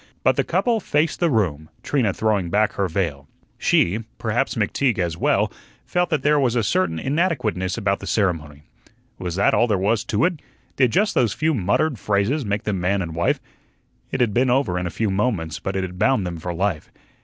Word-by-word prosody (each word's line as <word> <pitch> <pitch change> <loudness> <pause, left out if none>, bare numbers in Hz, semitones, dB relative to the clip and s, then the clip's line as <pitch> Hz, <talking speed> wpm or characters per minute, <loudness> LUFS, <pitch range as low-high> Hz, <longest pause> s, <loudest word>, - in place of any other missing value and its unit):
But - - +4
the - - +1
couple 235 -2 +1
faced 155 -4 0
the 170 - +2
room, 80 - 0
Trina 130 -8 +1
throwing 105 -4 0
back 105 +3 +2
her 100 - 0
veil. 80 -6 -2 0.3
She 95 +6 +2 0.2
perhaps - - -1
McTeague 130 -5 0
as 85 -3 -1
well - - +1 0.3
felt 180 -1 0
that 155 -5 0
there 150 0 +4
was 125 -4 +1
a 120 - +2
certain 90 -4 +1
inadequateness 125 - -1
about 100 -3 0
the - - -8
ceremony. 80 -8 -1 0.6
Was 90 -2 -4
that 100 - +3
all 120 - +3
there 105 -3 +1
was 105 +4 +1
to 110 +5 +1
it? 175 -3 -1 0.4
Did 130 -3 +3
just 205 - +2
those 115 -5 +2
few 155 +1 +1
muttered 120 - 0
phrases 105 +10 0
make 105 -1 -2
them 100 -4 -2
man 95 +2 +1
and 80 -2 -6
wife? 85 +2 +1 0.7
It - - -2
had 115 -4 +2
been 125 +3 +2
over 120 -8 +1
in 90 - -2
a - - -2
few 105 +3 -1
moments, 95 -5 -1
but 95 - -4
it 95 - 0
had 90 0 -6
bound 110 -3 +2
them 85 -2 -5
for 90 +2 -4
life. 85 -2 -2
100 Hz, 205 wpm, -22 LUFS, 90-130 Hz, 0.7 s, But